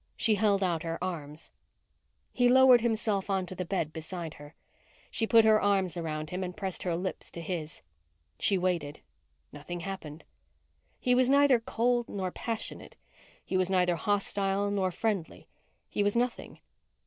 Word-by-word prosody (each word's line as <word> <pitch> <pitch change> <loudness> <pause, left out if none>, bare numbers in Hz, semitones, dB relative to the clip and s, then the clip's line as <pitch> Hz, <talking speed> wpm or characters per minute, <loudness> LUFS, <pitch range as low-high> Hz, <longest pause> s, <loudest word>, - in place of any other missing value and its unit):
She 225 - +2
held 200 -1 +2
out 170 -3 0
her 165 0 -3
arms. 155 -4 -5 0.8
He 245 -1 +3
lowered 260 -1 +7
himself 220 -4 0
onto 190 -2 -1
the 180 0 -4
bed 165 -4 -2
beside 165 0 -6
her. 145 +1 -13 0.6
She 225 - -1
put 225 -1 +6
her 215 -1 +5
arms 195 -3 +1
around 155 -2 -4
him 185 +1 -3
and 180 -1 -6
pressed 190 -3 -4
her 175 -2 -1
lips 185 +2 -4
to - - -8
his. 160 -2 -5 0.6
She 195 - +2
waited. 175 -5 -2 0.5
Nothing 170 +4 -7
happened. 170 -5 -7 0.8
He 250 - +2
was 250 0 +3
neither 280 -2 +5
cold 240 +1 0
nor 185 -2 -3
passionate. 225 +3 -6 0.5
He 190 - -1
was 185 0 +2
neither 180 -2 +2
hostile 200 +1 0
nor 195 -2 +1
friendly. 195 -2 -3 0.4
He - - -2
was 205 +1 +1
nothing. 240 0 -2
190 Hz, 155 wpm, -29 LUFS, 170-220 Hz, 0.8 s, lowered